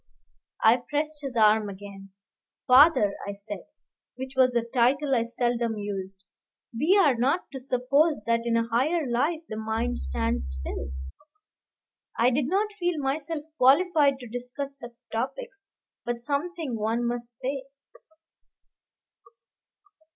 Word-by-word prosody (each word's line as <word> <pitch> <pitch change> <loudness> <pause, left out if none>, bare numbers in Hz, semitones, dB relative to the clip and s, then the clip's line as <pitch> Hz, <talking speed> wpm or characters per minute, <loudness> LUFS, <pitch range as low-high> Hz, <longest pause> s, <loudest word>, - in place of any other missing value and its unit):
I 225 +2 +6
pressed 300 +1 -1
his 270 -3 -6
arm 215 -1 +4
again. 195 0 -10 0.6
"Father," 255 -6 +6
I 200 - -3
said, 205 +1 -8 0.5
which 260 +1 -7
was 255 -1 +4
a 235 - +2
title 265 +4 +1
I 235 -2 +2
seldom 235 -1 -1
used, 195 -2 -6 0.5
"we 320 - +3
are 300 -8 +5
not 265 +9 +1
to 270 - -6
suppose 260 +2 +1
that 230 0 +2
in 230 -1 +2
a 230 0 0
higher 295 +8 +1
life 295 +8 0
the 215 - -6
mind 220 +2 -2
stands 65 0 -1
still." 65 +1 -5 1.2
I 240 +2 +4
did 260 +1 0
not 410 +5 0
feel 350 -2 0
myself 295 +2 -3
qualified 285 +1 +4
to 245 - -8
discuss 250 +4 -6
such 240 -1 -10 0.2
topics, 395 - -5 0.4
but 240 0 -3
something 295 +1 -3
one 225 +3 0
must 240 0 -3
say. 265 +1 -4
250 Hz, 130 wpm, -26 LUFS, 230-290 Hz, 1.2 s, I